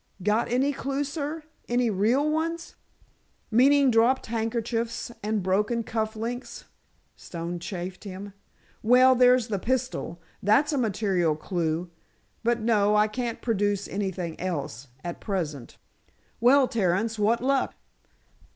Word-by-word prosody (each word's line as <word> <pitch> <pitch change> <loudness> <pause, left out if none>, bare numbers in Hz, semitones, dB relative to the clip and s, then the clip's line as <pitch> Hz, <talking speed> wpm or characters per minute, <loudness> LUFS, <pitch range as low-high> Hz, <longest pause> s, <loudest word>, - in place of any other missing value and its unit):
"Got 210 +3 +1
any 270 +4 +2
clue, 275 +1 -2
sir? 300 +2 -4 0.3
Any 240 -1 +2
real 230 +9 +2
ones?" 330 +2 -2 0.8
"Meaning 270 +3 +5
dropped 235 +3 +3
handkerchiefs 230 +1 -2
and 210 -1 -1
broken 210 +5 +1
cuff 220 -1 -2
links?" 240 +3 -5 0.5
Stone 170 0 -6
chaffed 180 +1 -6
him. 200 0 -8 0.5
"Well, 250 +3 +6
there's 250 -1 +4
the 200 -3 -1
pistol. 250 -7 -2 0.2
That's 275 +10 +3
a - - +1
material 195 -8 +1
clue. 170 +1 -2 0.5
But, 235 0 +1
no, 210 -2 +3
I 210 0 +4
can't 235 +2 -4
produce 205 -3 0
anything 190 -4 -4
else—at 140 -3 -5
present. 155 - -4 0.6
Well, 260 +3 +5
Terence, 220 +1 0
what 220 +3 +3
luck?" 270 +1 0
220 Hz, 120 wpm, -26 LUFS, 190-250 Hz, 0.8 s, Well